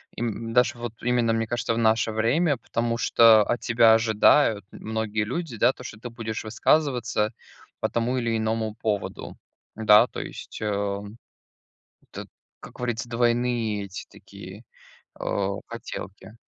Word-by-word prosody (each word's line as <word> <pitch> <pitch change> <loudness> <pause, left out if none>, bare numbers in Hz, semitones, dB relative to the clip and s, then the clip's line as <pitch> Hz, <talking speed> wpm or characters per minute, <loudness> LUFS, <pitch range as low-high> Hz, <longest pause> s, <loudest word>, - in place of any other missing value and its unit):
им 115 0 -4
даже, 125 -1 +3
вот, 120 -1 -6
именно, 120 -2 +1
мне 115 0 0
кажется, 120 -1 -1
в - - -3
наше 110 -1 +2
время, 135 +7 +1
потому 115 0 -2
что 115 -2 +6
от 120 - -1
тебя 115 -2 +4
ожидают 110 -1 +3
многие 110 -1 -3
люди, 130 +1 -4
да 120 +4 +4
что 105 -4 -9
ты 120 - -7
будешь 115 -2 -5
высказываться 120 -2 +1 0.5
по - - -1
тому 120 +2 -1
или 115 -2 0
иному 110 0 -1
поводу. 105 -3 -4 0.4
Да, 105 -1 +6
то - - -8
есть, - - -8
э, 100 -1 -2 1.1
это - - -7 0.3
как - - -12
говорится, 120 -1 -3
двойные 120 -3 0
эти 95 -1 -8
такие, - - -12 0.6
э, 100 -1 -1 0.2
хотелки. 105 -2 -8
115 Hz, 140 wpm, -25 LUFS, 110-120 Hz, 1.1 s, что